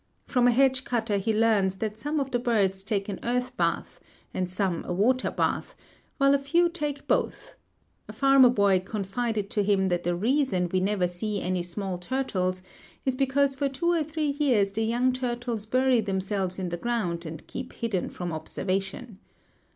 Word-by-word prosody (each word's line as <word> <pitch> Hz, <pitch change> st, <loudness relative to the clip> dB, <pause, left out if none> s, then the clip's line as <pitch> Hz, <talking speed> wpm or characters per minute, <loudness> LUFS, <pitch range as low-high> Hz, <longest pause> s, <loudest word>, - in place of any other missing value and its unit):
From 250 Hz, -2 st, +2 dB
a -, -, +6 dB
hedge 260 Hz, +1 st, +3 dB
cutter 225 Hz, -5 st, 0 dB
he 215 Hz, +3 st, 0 dB
learns 210 Hz, -4 st, +2 dB
that 215 Hz, +1 st, -3 dB
some 295 Hz, +7 st, -2 dB
of 270 Hz, -1 st, -2 dB
the 245 Hz, -, +1 dB
birds 205 Hz, -6 st, +1 dB
take 200 Hz, -1 st, -2 dB
an 200 Hz, -3 st, -4 dB
earth 250 Hz, +1 st, -1 dB
bath -, -, -1 dB, 0.3 s
and 185 Hz, -1 st, -2 dB
some 185 Hz, -2 st, -1 dB
a -, -, -4 dB
water 235 Hz, +8 st, +2 dB
bath, -, -, -1 dB, 0.4 s
while 275 Hz, 0 st, +4 dB
a 280 Hz, -, +3 dB
few 340 Hz, +5 st, +2 dB
take 295 Hz, -5 st, -4 dB
both; -, -, -1 dB, 0.5 s
a -, -, -8 dB
farmer 270 Hz, -2 st, +6 dB
boy 200 Hz, -5 st, +3 dB
confided 205 Hz, +2 st, -3 dB
to 210 Hz, -, +1 dB
him 195 Hz, -1 st, +2 dB
that 175 Hz, -1 st, 0 dB
the 175 Hz, 0 st, 0 dB
reason 220 Hz, -3 st, +1 dB
we 185 Hz, -, +2 dB
never 190 Hz, -1 st, +1 dB
see 200 Hz, +4 st, -3 dB
any 180 Hz, 0 st, -1 dB
small 180 Hz, +1 st, -4 dB
turtles 185 Hz, -5 st, -1 dB, 0.4 s
is 265 Hz, -, +2 dB
because 275 Hz, +1 st, +2 dB
for 275 Hz, +1 st, -1 dB
two 310 Hz, +6 st, 0 dB
or 335 Hz, -2 st, +2 dB
three 300 Hz, -2 st, -2 dB
years 230 Hz, -9 st, +3 dB
the 220 Hz, -, -2 dB
young 240 Hz, +3 st, +2 dB
turtles 240 Hz, -3 st, -3 dB
bury 255 Hz, 0 st, +3 dB
themselves 190 Hz, -2 st, -1 dB
in 185 Hz, -2 st, -3 dB
the 175 Hz, -, -3 dB
ground 180 Hz, -6 st, -2 dB
and 160 Hz, 0 st, -8 dB
keep 255 Hz, 0 st, -7 dB
hidden 220 Hz, -6 st, -2 dB
from 175 Hz, -2 st, -5 dB
observation. 190 Hz, +6 st, -3 dB
220 Hz, 180 wpm, -27 LUFS, 190-260 Hz, 0.5 s, a